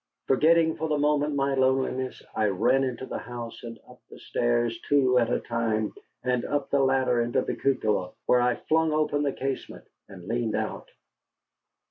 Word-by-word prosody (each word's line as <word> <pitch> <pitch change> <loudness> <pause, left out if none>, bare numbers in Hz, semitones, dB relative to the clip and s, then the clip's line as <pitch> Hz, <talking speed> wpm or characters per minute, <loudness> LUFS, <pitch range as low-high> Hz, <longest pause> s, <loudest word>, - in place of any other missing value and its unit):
Forgetting 160 +4 +3
for 160 - -2
the 150 - +1
moment 150 0 +1
my 140 0 +1
loneliness, 130 -1 0
I 110 - +1
ran 105 +7 +2
into 130 -1 -3
the - - -5
house 120 -1 -8
and 115 -1 -8
up - - -16
the - - -12
stairs 120 -1 -1
two 130 -3 +4
at 120 0 +1
a - - +1
time, 115 -2 -1 0.3
and 125 -1 0
up 145 -1 -2
the 140 - +3
ladder 130 -2 +2
into 120 0 0
the - - -3
cupola, 105 -9 0
where 125 - +4
I 125 -1 +2
flung 160 0 +2
open 150 -1 +1
the 145 -1 +1
casement 135 0 -5 0.2
and 90 -3 -11
leaned 115 0 -1
out. - - -4
130 Hz, 175 wpm, -26 LUFS, 120-140 Hz, 0.3 s, two